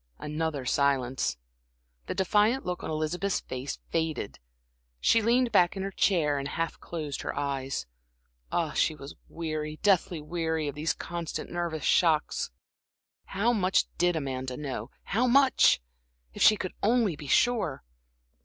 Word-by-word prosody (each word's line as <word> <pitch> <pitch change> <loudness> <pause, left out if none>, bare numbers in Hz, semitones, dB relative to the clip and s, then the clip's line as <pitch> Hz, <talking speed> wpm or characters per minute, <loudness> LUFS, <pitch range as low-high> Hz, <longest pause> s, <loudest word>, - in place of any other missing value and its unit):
Another 150 -2 -3
silence. 135 - +1 0.7
The - - -3
defiant 210 +7 +2
look 180 0 -3
on - - -4
Elizabeth's 160 +5 -1
face 130 +2 -5
faded; 160 -10 -2 0.6
she 225 - +4
leaned 240 +2 +2
back 180 -2 +4
in 190 - -2
her 195 - -3
chair 155 -8 +2
and 140 - -3
half 165 +3 -3
closed 155 -5 -5
her - - -4
eyes. 135 - -2 0.7
Ah, 165 -3 0
she 155 - +2
was 140 0 -9 0.2
weary, 155 -2 -4
deathly 185 -4 +3
weary, 160 0 -2
of 145 - -3
these 150 +3 -1
constant 170 -1 -5
nervous 170 -3 -3
shocks. 160 -4 +2 0.8
How 215 +5 +1
much 190 -4 +2
did 175 0 +3
Amanda 130 -4 -3
know 140 -3 -5
how 235 +6 +1
much? 265 - +5 0.5
If - - -8
she 215 - +7
could 185 - -4
only 220 -5 +2
be 145 0 -9
sure! 210 - +2
160 Hz, 145 wpm, -28 LUFS, 145-195 Hz, 0.8 s, she